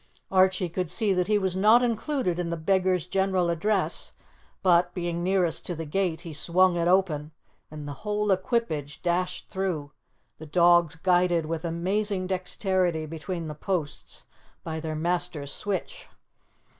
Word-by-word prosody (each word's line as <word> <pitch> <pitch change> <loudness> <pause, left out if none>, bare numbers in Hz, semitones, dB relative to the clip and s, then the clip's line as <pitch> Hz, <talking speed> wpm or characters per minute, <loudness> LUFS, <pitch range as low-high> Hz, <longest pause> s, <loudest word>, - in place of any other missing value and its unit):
Archie 185 -1 +3
could 175 0 -3
see 210 +1 +1
that 180 -1 0
he 210 0 +3
was 190 -2 0
not 215 +6 +5
included 235 - -1
in 175 -1 -2
the 170 - -2
beggar's 185 +1 +1
general 190 -2 +1
address, 195 +4 -1 0.5
but, 175 -1 +3
being 175 -1 -2
nearest 180 -2 +1
to 175 - -4
the 165 0 -5
gate, 170 +1 -1
he 170 -3 -8
swung 175 +4 +3
it 170 0 0
open 170 -5 +1 0.4
and 150 -1 -8
the 145 - -5
whole 210 -1 0
equipage 185 - -1
dashed 180 +1 -1
through, 175 -7 -3 0.5
the 155 - -9
dogs 175 0 +4
guided 175 -1 +2
with 165 +1 -4
amazing 185 +4 -1
dexterity 185 -2 0
between 165 +2 -5
the 150 - -5
posts 160 -1 -4 0.4
by 160 -1 -4
their 155 0 -4
master's 170 -3 -1
switch. 200 -3 -4
180 Hz, 150 wpm, -26 LUFS, 165-190 Hz, 0.5 s, not